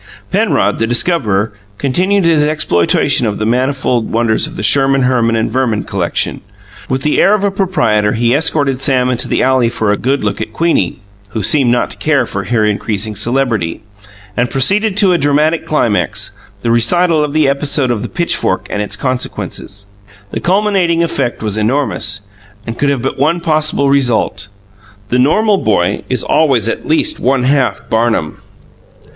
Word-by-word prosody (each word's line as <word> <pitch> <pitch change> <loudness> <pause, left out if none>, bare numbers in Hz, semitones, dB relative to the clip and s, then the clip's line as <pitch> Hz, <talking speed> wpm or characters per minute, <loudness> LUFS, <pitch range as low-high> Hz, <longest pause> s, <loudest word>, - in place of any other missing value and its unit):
Penrod, - - +1
the 115 - 0
discoverer, 115 - 0 0.2
continued 185 +8 0
his 165 -3 +3
exploitation 140 - +2
of 105 - -2
the 110 - -2
manifold 125 -1 0
wonders 115 -1 +1
of - - -11
the 105 - -5
Sherman, 135 +2 +3
Herman, 120 -2 +1
and 110 - 0
Verman 120 -6 0
collection. 95 -5 -2 0.5
With 130 +1 -2
the 150 - +2
air 205 - +4
of 205 - -3
a 200 - +1
proprietor 115 - 0
he 120 +1 +1
escorted 145 -3 +1
Sam 130 -2 +2
into 125 +1 0
the - - 0
alley 130 -2 +2
for 110 -3 -1
a 105 - 0
good 135 +1 -1
look 105 -1 -2
at - - -5
Queenie 165 - 0 0.3
(who 110 0 -4
seemed 135 0 +3
not 120 0 0
to - - -8
care 145 -5 +1
for 100 -3 -5
her 110 +2 +1
increasing 105 0 -2
celebrity) 110 -5 -1 0.5
and 125 0 0
proceeded 200 - +1
to 195 -4 +4
a 175 - +1
dramatic 150 +3 +1
climax 115 -9 0 0.3
the 115 - +1
recital 155 +8 +2
of 145 -1 -3
the 155 -2 +2
episode 140 -1 0
of 115 -4 -2
the - - -5
pitchfork 170 -1 -1
and 105 - -2
its 105 0 -3
consequences. 105 -5 -5 0.5
The - - -3
cumulative 185 -3 +1
effect 135 -9 -2
was 105 0 -1
enormous, 110 -3 -1 0.4
and 115 - -5
could 140 +3 0
have 135 -4 -1
but 135 - -3
one 160 +5 +1
possible 155 -3 +1
result. 125 -7 0 0.6
The 125 - +1
normal 200 +10 +2
boy 100 -3 0
is 130 - -1
always 135 -8 +2
at 115 - -3
least 310 - +1
one 130 -1 +1
half 135 0 0
Barnum. 110 -8 -1
130 Hz, 170 wpm, -14 LUFS, 110-155 Hz, 0.6 s, air